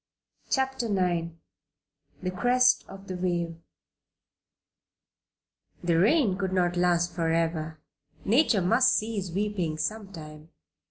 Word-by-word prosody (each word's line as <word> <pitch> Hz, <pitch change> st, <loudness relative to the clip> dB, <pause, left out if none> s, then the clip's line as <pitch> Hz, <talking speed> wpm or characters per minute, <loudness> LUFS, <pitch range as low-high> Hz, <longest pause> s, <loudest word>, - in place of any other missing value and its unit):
CHAPTER 265 Hz, -2 st, 0 dB
IX 175 Hz, -4 st, 0 dB, 0.9 s
THE 185 Hz, -, -1 dB
CREST 250 Hz, +6 st, +3 dB
OF 195 Hz, 0 st, -11 dB
THE 185 Hz, -, -5 dB
WAVE 170 Hz, -2 st, -2 dB, 2.3 s
The 170 Hz, -1 st, +2 dB
rain 210 Hz, -, +3 dB
could 190 Hz, -2 st, -2 dB
not 180 Hz, -1 st, +1 dB
last 175 Hz, -1 st, +1 dB
forever; 160 Hz, -2 st, -1 dB, 0.5 s
Nature 225 Hz, -, +3 dB
must 230 Hz, +8 st, +4 dB
cease 215 Hz, -4 st, -3 dB
weeping 185 Hz, -4 st, -2 dB
some 200 Hz, +5 st, -3 dB
time. 155 Hz, -2 st, -11 dB
185 Hz, 105 wpm, -27 LUFS, 170-215 Hz, 2.3 s, must